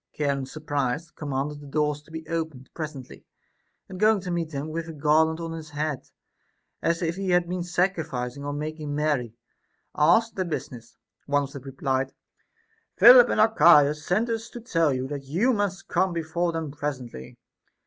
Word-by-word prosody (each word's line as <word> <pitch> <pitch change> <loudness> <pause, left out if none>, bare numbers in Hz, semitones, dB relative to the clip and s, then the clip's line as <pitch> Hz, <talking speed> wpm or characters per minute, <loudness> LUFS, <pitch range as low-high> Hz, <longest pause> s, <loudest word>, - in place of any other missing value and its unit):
Charon 140 -3 -1
surprised 150 0 -3
commanded 145 0 -3
the 145 - -11
doors 150 0 0
to 150 - -23
be 160 0 -8
opened 160 -6 -4
pres 155 -2 -5
ently, 130 -2 -11 0.6
and 185 -1 -9
going 215 0 +4
to 180 -1 -5
meet 170 -2 -2
them 145 0 -5
with 165 +1 -4
a - - -6
garland 155 +2 +2
on 165 -1 -5
his 160 -1 -7
head, 150 -2 -3 0.7
as 170 +1 0
if 170 +1 -1
he 195 -1 -2
had 175 -1 +3
been 180 +1 -3
sacrificing 160 -8 -2
or 145 - -3
making 150 0 -4
merry, 145 -7 -1 0.6
asked 180 +10 +3
their 190 - 0
business. 120 -8 -6 0.3
One 145 0 +2
of 140 - -7
them 140 -2 -8
replied, 135 0 -2 0.8
Philip 245 0 +9
and - - 0
Archias 150 -8 +5
sent 205 +9 +1
us 225 +1 -3
to 240 - -8
tell 165 - +1
you 130 0 -2
that 140 -1 -6
you 190 - +1
must 205 -4 -2
come 185 -2 +1
before 170 +1 -1
them 160 -3 -4
presently. 130 - -6
155 Hz, 175 wpm, -25 LUFS, 140-175 Hz, 0.8 s, Philip